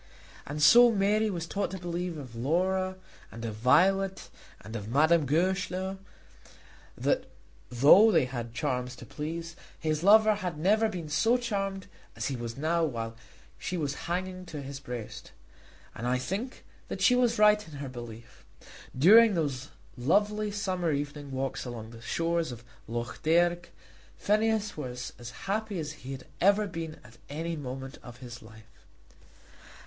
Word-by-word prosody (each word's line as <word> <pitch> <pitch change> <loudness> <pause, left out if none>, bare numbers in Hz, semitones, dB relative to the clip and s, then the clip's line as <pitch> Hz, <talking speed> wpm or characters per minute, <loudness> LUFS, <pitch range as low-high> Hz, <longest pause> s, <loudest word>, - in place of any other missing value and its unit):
And 150 +1 -2
so 240 +8 +8
Mary 210 +1 +2
was 170 -4 -3
taught 200 +4 -2
to 190 - -5
believe 175 -1 -4
of 130 -5 -9
Laura 185 +9 0 0.4
and 115 0 -7
of 110 - -3
Violet 190 - +2 0.3
and 110 +4 -9
of 105 -2 -5
Madame 155 +5 +3
Goesler, 190 +4 0 1.0
that - - 0 0.4
though 145 - +7
they 160 -8 +4
had 125 -2 -5
had 115 - -16
charms 125 -2 -2
to 120 - -11
please, 165 +6 -5 0.3
her 155 -1 +2
lover 215 +7 +6
had 180 -6 -4
never 215 +7 +3
been 175 -6 -5
so 225 +11 +3
charmed 195 -5 -3 0.3
as - - -2
he 135 - -2
was 120 -1 -6
now 165 +3 +1
while 115 -6 -3 0.4
she 180 - -3
was 145 -4 -1 0.2
hanging 185 +1 -3
to 150 -4 -6
his 135 0 -7
breast. 120 -5 -8 0.6
And 120 - -5
I 125 +1 +2
think 200 - -4 0.2
that - - -5
she 250 - +6
was 245 -2 +2
right 210 0 +5
in 155 - -11
her 140 0 -5
belief. 120 -2 -10 0.5
During 210 - +7
those 145 -4 -2 0.3
lovely 210 +11 +1
summer 185 -4 -1
evening 145 0 -4
walks 135 0 -3
along 115 -3 -7
the 115 -1 -12
shores 165 +4 -1
of 120 -1 -9 0.2
Lough 120 +2 -3
Derg, 175 +2 +2 0.5
Phineas 215 0 +1
was 125 -4 -6
as 120 0 -7 0.2
happy 210 0 -2
as 155 -2 -3
he 135 -3 -9
had 130 - -9 0.2
ever 200 +3 +4
been 165 -4 -6
at 115 +2 -17
any 165 +3 -3
moment 135 -1 -7
of 120 -1 -11
his 120 -1 -10
life. 110 0 -17
160 Hz, 160 wpm, -29 LUFS, 125-195 Hz, 1.0 s, so